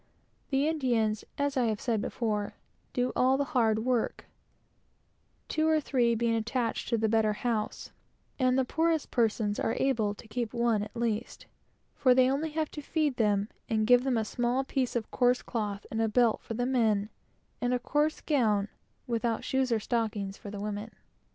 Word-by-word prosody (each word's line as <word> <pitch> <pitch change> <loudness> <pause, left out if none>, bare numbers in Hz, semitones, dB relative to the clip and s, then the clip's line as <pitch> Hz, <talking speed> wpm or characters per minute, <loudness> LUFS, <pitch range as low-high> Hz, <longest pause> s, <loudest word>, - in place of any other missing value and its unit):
The 275 +2 +2
Indians, 235 -9 +1
as 285 -1 0
I 255 -2 +2
have 215 -2 0
said 225 -4 0
before, 210 -3 -2 0.4
do 250 0 0
all 260 +1 +3
the 285 - +1
hard 220 -3 +2
work, 250 -3 0 1.2
two 315 0 +1
or 315 -1 +4
three 245 -5 +1
being 230 0 +1
attached 230 +1 -1
to 235 - +2
each 220 -1 +2
house; 225 -3 -2 0.5
and 255 -1 +3
the 265 - +2
poorest 320 +2 0
persons 220 -3 +1
are 225 - 0
able 225 -6 +1
to 220 - -13
keep 230 0 -3
one, 235 -3 +2
at 210 - -7
least, 230 -1 -2 0.5
for 255 -2 +4
they 255 0 +6
have 260 - +2
only 310 +3 -2
to 310 -1 -3
feed 295 -2 0
them 205 -2 +2 0.2
and 220 -1 +1
give 245 +2 +5
them 260 -3 +1
a 220 - 0
small 245 +4 0
piece 265 -2 -1
of 230 -2 -2
coarse 245 0 +2
cloth 210 -4 -3
and 225 - -1
a 225 - +2
belt, 235 0 +3
for 225 - -6
the 245 +2 0
males; 220 -5 +2 0.5
and 245 0 +1
a 250 - +2
coarse 295 +5 0
gown, 215 -9 +1 0.4
without 230 -1 -1
shoes 265 -1 0
or 230 - +2
stockings, 210 -4 -2
for 205 - -9
the 205 - -6
females. 210 +1 -4
235 Hz, 180 wpm, -29 LUFS, 220-260 Hz, 1.2 s, they